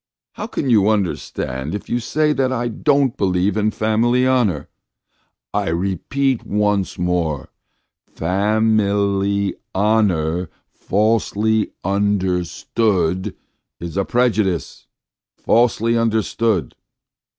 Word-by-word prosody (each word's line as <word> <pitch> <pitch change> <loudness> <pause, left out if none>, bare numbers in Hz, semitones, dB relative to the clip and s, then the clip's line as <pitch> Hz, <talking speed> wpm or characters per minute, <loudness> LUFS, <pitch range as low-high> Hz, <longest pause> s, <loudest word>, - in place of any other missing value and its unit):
"How - - -6
can - - -3
you 105 -2 +4
understand 80 -7 -2
if 105 - -6
you 120 - 0
say 150 +5 +1
that 130 -2 0
I 120 -1 -1
don't 140 +2 +1
believe 95 +1 +1
in 110 0 +2
family 115 +4 +1
honour? 115 - +1 0.9
I - - 0
repeat 100 +10 -1
once 105 -2 0
more: 85 -6 -1 0.6
fa 100 +6 0
mil 100 -3 +2
y 100 0 0 0.2
ho 105 +3 +3
nour 85 -3 0 0.2
fal 110 +3 +1
sely 110 +2 0 0.2
un 100 +2 +1
der 90 -2 0
stood 95 -3 -1 0.4
is 85 -1 -6
a 100 - +1
prejudice! 110 -7 0 0.5
Falsely 115 0 +2
understood! 110 -3 0
105 Hz, 115 wpm, -20 LUFS, 95-115 Hz, 0.9 s, you